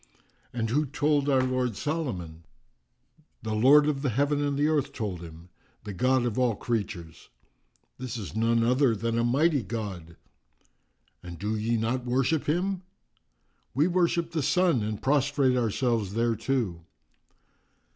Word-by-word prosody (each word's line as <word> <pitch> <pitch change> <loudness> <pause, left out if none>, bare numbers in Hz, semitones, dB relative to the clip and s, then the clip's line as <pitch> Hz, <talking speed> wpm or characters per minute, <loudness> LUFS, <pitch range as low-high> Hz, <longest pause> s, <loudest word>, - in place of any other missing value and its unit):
"And 115 -2 -2
who 150 +3 +1
told 145 +1 +1
our 130 -2 +3
lord 130 -3 -1
Solomon?" 105 - -4 1.0
"The 110 - -3
Lord 135 +7 +6
of 145 -2 -1
the 140 - 0
heaven 145 +5 +1
and 145 -1 -1
the 145 +1 +2
earth 145 -3 0
told 100 -9 -4
him, 85 +1 -11 0.3
the 105 -1 -6
God 130 +5 +2
of 120 0 -1
all 125 -4 +2
creatures!" 100 -8 -4 0.7
"This 125 -2 -5
is 100 -4 -7
none 115 +1 +2
other 125 0 +3
than 115 +2 -1
a - - +1
mighty 140 +4 +2
God!" 95 -7 -6 1.1
"And 90 -1 -9
do 105 +5 -2
ye 115 +2 0
not 120 +3 -1
worship 135 +5 0
him?" 180 +4 0 0.9
"We 145 +4 +3
worship 170 -1 +1
the 165 -2 -1
Sun, 175 -3 +2
and 105 0 -3
prostrate 140 -1 +2
ourselves 115 -3 0
thereto." 115 -5 -1
125 Hz, 145 wpm, -27 LUFS, 110-145 Hz, 1.1 s, Lord